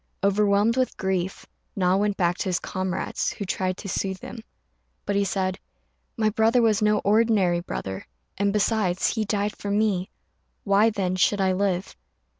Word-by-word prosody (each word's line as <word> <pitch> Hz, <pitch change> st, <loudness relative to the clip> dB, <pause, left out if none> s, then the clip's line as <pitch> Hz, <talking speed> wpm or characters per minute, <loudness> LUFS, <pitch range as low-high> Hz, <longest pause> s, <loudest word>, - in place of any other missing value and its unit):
Overwhelmed 205 Hz, +3 st, +3 dB
with 255 Hz, -1 st, 0 dB
grief, 190 Hz, -1 st, -2 dB, 0.3 s
Na 185 Hz, -1 st, +2 dB
went 205 Hz, 0 st, 0 dB
back 175 Hz, -2 st, +2 dB
to -, -, -1 dB
his 180 Hz, -, +1 dB
comrades, 185 Hz, 0 st, -3 dB
who 200 Hz, -, -5 dB
tried 185 Hz, 0 st, -2 dB
to 200 Hz, -, -8 dB
soothe 190 Hz, 0 st, -2 dB
him; 225 Hz, +3 st, -9 dB, 0.6 s
but 200 Hz, -, -1 dB
he 200 Hz, -, +3 dB
said, 190 Hz, -1 st, -1 dB, 0.6 s
"My 215 Hz, -1 st, +2 dB
brother 225 Hz, +3 st, +3 dB
was 220 Hz, -3 st, +3 dB
no 210 Hz, 0 st, +3 dB
ordinary 205 Hz, -4 st, +3 dB
brother, 95 Hz, -, -6 dB, 0.3 s
and, 200 Hz, 0 st, +1 dB
besides, 205 Hz, -3 st, +1 dB
he 220 Hz, -2 st, -1 dB
died 205 Hz, 0 st, -1 dB
for 205 Hz, -, -6 dB
me; 200 Hz, -3 st, +1 dB, 0.5 s
why, 200 Hz, +2 st, +4 dB
then, 185 Hz, -4 st, -2 dB
should 200 Hz, +3 st, +2 dB
I 190 Hz, -1 st, +2 dB
live?" 190 Hz, -1 st, -1 dB
200 Hz, 165 wpm, -25 LUFS, 185-210 Hz, 0.6 s, why